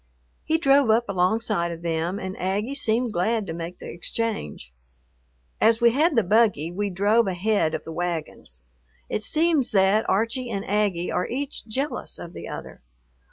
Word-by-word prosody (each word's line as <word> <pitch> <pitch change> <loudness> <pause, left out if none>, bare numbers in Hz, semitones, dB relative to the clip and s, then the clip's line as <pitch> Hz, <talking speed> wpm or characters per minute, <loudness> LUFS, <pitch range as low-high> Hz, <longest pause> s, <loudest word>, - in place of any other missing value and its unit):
He 320 - +1
drove 275 -5 +4
up 230 +2 +3
alongside 195 -1 0
of 170 0 -8
them, 170 +3 -1
and 190 -1 -5
Aggie 200 +8 -1
seemed 240 -3 0
glad 215 +5 0
to 165 - -5
make 170 +2 -6
the - - -11
exchange. 175 - -4 0.9
As 225 0 +4
we 235 -1 +5
had 300 +5 +2
the 230 - +4
buggy, 200 -5 +2
we 200 +3 -2
drove 205 +5 +2
ahead 185 -3 +1
of - - -5
the 165 - -8
wagons. 160 - -5 0.5
It - - -1
seems 310 +3 +2
that 195 +2 +3
Archie 230 +5 0
and 200 -3 -3
Aggie 200 -4 0
are 180 - -1
each 275 0 -5
jealous 270 +7 -3
of 170 - -9
the - - -8
other. - - -8
205 Hz, 165 wpm, -24 LUFS, 175-235 Hz, 0.9 s, we